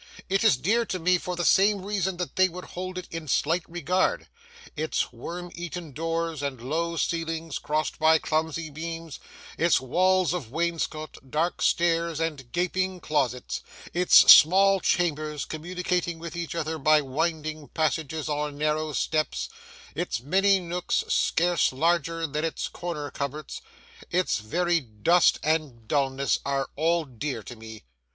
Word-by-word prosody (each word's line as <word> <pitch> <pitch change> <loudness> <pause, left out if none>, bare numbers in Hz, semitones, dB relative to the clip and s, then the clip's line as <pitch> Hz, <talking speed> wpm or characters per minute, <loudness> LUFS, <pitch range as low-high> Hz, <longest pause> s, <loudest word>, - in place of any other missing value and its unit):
It 195 +3 +2
is 220 - +5
dear 220 - +2
to 185 - -2
me 180 +1 +2
for 180 +1 -4
the 175 -1 -2
same 195 +1 +4
reason 190 -3 -1
that 180 -1 -4
they 185 0 +4
would 180 +1 -8
hold 185 +1 -6
it 185 - -6
in 165 -2 -6
slight 160 +6 +1
regard. 175 +2 0 0.5
Its 155 -4 -1
worm 175 +9 -7
eaten 175 -2 -6
doors, 165 +1 -2
and 140 -3 -3
low 165 +7 -2
ceilings 165 -1 -2
crossed 155 +2 -2
by 160 0 +5
clumsy 160 0 -2
beams; 165 0 -6 0.4
its 170 +1 +4
walls 180 +6 +2
of 160 -11 -4
wainscot, 165 -1 -2
dark 160 +5 -1
stairs, 170 -1 +1
and 150 -7 -3
gaping 185 +1 -1
closets; 135 -6 -1 0.3
its 180 +1 +3 0.2
small 195 +4 +6
chambers, 155 -5 0
communicating 175 +1 -2
with 170 0 -8
each 170 -1 -4
other 160 -1 -2
by 155 +1 +5
winding 155 +1 -2
passages 155 -1 -1
or 150 0 -1
narrow 155 +1 -1
steps; 155 +2 -1 0.4
its 175 - -2
many 195 +9 +3
nooks, 175 0 -1
scarce 175 -1 +2
larger 165 +3 0
than 150 0 -3
its 165 - -2
corner 160 -5 -5
cupboards; 140 +2 -5 0.5
its 180 +1 +1
very 170 +11 +1
dust 135 +8 +3
and 150 -8 -1
dulness, 135 0 +1
are 135 -1 -2
all 165 +2 +1
dear 130 -2 -5
to 120 - -9
me. 110 -1 -11
165 Hz, 145 wpm, -26 LUFS, 150-175 Hz, 0.5 s, small